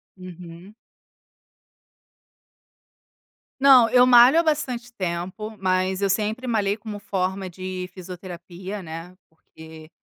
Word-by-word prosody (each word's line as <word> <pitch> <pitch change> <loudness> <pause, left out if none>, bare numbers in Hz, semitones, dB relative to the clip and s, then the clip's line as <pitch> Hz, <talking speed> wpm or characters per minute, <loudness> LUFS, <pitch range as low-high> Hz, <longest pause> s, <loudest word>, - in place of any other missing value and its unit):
Uhum. 180 +1 -12 2.9
Não, 265 -4 +7
eu 250 +1 +5
malho 250 +5 +7
há - - +2
bastante 255 -7 -2
tempo, 185 +3 -5
mas 185 0 0
eu 195 - +2
sempre 215 +5 -2
malhei 210 -4 0
como 215 -1 -8
forma 190 -1 -3
de 185 +1 -6
fisioterapia, 185 +1 -9
né, 165 +3 -9
porque 160 0 -15
190 Hz, 100 wpm, -23 LUFS, 180-225 Hz, 2.9 s, Não